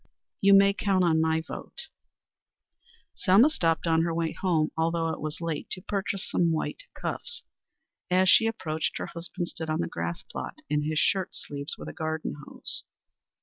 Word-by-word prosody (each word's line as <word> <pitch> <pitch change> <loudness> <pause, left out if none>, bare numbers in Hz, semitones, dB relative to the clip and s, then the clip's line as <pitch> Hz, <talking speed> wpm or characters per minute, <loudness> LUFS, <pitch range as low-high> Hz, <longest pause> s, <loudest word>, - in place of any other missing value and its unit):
"You 200 0 +6
may 200 0 +6
count 195 -2 +1
on 160 -2 +3
my 160 0 +2
vote." 320 - -8 1.3
Selma 215 +10 +5
stopped 165 - +1
on 165 -1 +3
her 170 0 0
way 165 -1 0
home, 165 -5 +1
although 165 0 +1
it - - -4
was 155 +1 -4
late, 165 -2 -3
to 185 - -5
purchase 195 -1 -2
some 170 -1 +2
white 160 - -2
cuffs. 480 -1 -5 0.7
As 185 +1 +4
she 225 +4 +7
approached, 160 -8 -2
her - - -3
husband 170 +1 -4
stood 160 -1 -6
on 155 - 0
the 85 - -1
grass 85 +1 -4
plot - - -7
in 150 0 +2
his 155 0 -1
shirt 190 +3 +1
sleeves 140 +1 -4
with - - -8
a - - -6
garden 160 0 -3
hose. - - +1
165 Hz, 175 wpm, -28 LUFS, 160-190 Hz, 1.3 s, she